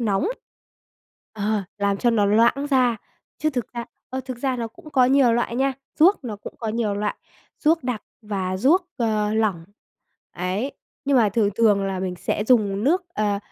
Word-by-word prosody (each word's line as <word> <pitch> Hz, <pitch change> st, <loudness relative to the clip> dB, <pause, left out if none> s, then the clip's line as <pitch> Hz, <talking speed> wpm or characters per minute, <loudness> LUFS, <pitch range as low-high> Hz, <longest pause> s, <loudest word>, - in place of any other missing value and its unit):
nóng, 220 Hz, -, +1 dB, 1.0 s
ờ, 210 Hz, -1 st, -1 dB, 0.2 s
làm 200 Hz, -1 st, +1 dB
cho 240 Hz, +3 st, +2 dB
nó 220 Hz, -3 st, +3 dB
loãng 235 Hz, +7 st, +3 dB
ra, 250 Hz, -3 st, +3 dB, 0.4 s
chứ 310 Hz, -, +1 dB
thực 250 Hz, -4 st, -4 dB
ra 235 Hz, -1 st, -4 dB, 0.3 s
ơ, 260 Hz, +1 st, -3 dB
thực 255 Hz, -2 st, -5 dB
ra 260 Hz, 0 st, -1 dB
nó 230 Hz, -1 st, -3 dB
cũng 310 Hz, +5 st, -15 dB
có 255 Hz, -3 st, +4 dB
nhiều 260 Hz, -3 st, +4 dB
loại 240 Hz, 0 st, 0 dB
nha, 270 Hz, +1 st, +2 dB, 0.3 s
ruốc 345 Hz, -1 st, +5 dB
nó 220 Hz, -4 st, -4 dB
cũng 205 Hz, -, -10 dB
có 225 Hz, -, -3 dB
nhiều 215 Hz, -2 st, -1 dB
loại, 205 Hz, +1 st, -2 dB, 0.4 s
ruốc 320 Hz, -3 st, +2 dB
đặc 245 Hz, -4 st, -2 dB, 0.2 s
và 190 Hz, -3 st, -2 dB
ruốc, 335 Hz, -, +3 dB
ờ, 215 Hz, -3 st, 0 dB
lỏng. 205 Hz, -7 st, 0 dB, 0.7 s
Ấy, 190 Hz, +9 st, -2 dB, 0.3 s
nhưng 280 Hz, -1 st, +3 dB
mà 225 Hz, -4 st, +5 dB
thường 205 Hz, 0 st, +1 dB
thường 210 Hz, -3 st, +3 dB
là 190 Hz, -1 st, -2 dB
mình 185 Hz, -1 st, -2 dB
sẽ 205 Hz, +3 st, -2 dB
dùng 215 Hz, -3 st, +2 dB
nước 355 Hz, +7 st, +3 dB
ờ, 205 Hz, -1 st, 0 dB
230 Hz, 185 wpm, -23 LUFS, 205-260 Hz, 1.0 s, ruốc